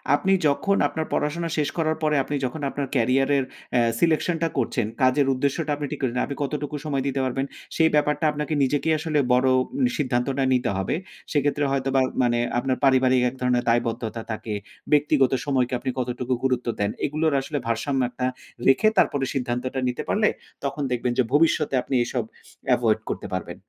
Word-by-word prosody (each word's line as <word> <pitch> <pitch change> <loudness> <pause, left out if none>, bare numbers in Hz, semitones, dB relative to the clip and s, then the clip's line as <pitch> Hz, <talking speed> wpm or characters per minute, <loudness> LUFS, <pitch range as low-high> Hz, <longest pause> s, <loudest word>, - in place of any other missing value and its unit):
আপনি 195 +5 +1
যখন 200 +8 +1
আপনার 160 +1 -3
পড়াশোনা 165 +3 -1
শেষ 150 -1 +1
করার 160 -1 +1
পরে 150 -1 +2
আপনি 145 - -3
যখন 145 +4 -4
আপনার 140 -1 -3
ক্যারিয়ারের 135 +3 +2 0.3
অ্যা 120 - +4 0.2
selection 165 +1 +2
টা - - +3
করছেন 120 -4 0 0.2
কাজের 130 +2 +3
উদ্দেশ্যটা 140 +4 -1
আপনি 145 0 -4
ঠিক - - -4
করলেন, 125 -1 0
আপনি 140 - -5
কতটুকু 145 +1 -3
সময় 140 -3 -1
দিতে 135 0 -1
পারবেন 135 +2 -1 0.3
সেই 160 -1 +4
ব্যাপারটা 150 +1 +1
আপনাকে 150 +1 -3
নিজেকেই 145 +4 +1
আসলে 155 -2 0
বড় 130 +1 +3 0.5
সিদ্ধান্তটা 135 0 0
নিতে 125 -1 +1
হবে। 95 +9 -1 0.4
সেক্ষেত্রে 145 -1 +1
হয়তোবা 135 0 +1 0.2
মানে 120 -1 +2 0.2
আপনার 130 0 -1
পারিবারিক 130 -1 +4
এক 130 - -12
ধরণের 125 -1 +2
দায়বদ্ধতা 115 -1 -1
থাকে। 110 0 -4 0.4
ব্যক্তিগত 145 -3 +4
সময়কে 130 -3 +1
আপনি - - -3
কতটুকু 125 0 -2
গুরুত্ব 125 -2 0
দেন। 100 0 +1
এগুলোর 155 +1 0
আসলে 145 +2 -4
ভারসাম্য 130 +4 0
একটা 125 +1 -3 0.4
রেখে 135 +11 +5
তারপরে 135 -2 +3
সিদ্ধান্তটা 125 0 -2
নিতে 125 - -4
পারলে 210 0 +3 0.3
তখন 140 +1 -3
দেখবেন 125 0 0
যে 130 - +4
ভবিষ্যতে 155 -2 +3
আপনি 130 - -3
এসব 120 -1 -2 0.5
এভয়েড - - +1
করতে - - -4
পারবেন। - - -5
135 Hz, 170 wpm, -24 LUFS, 125-150 Hz, 0.5 s, রেখে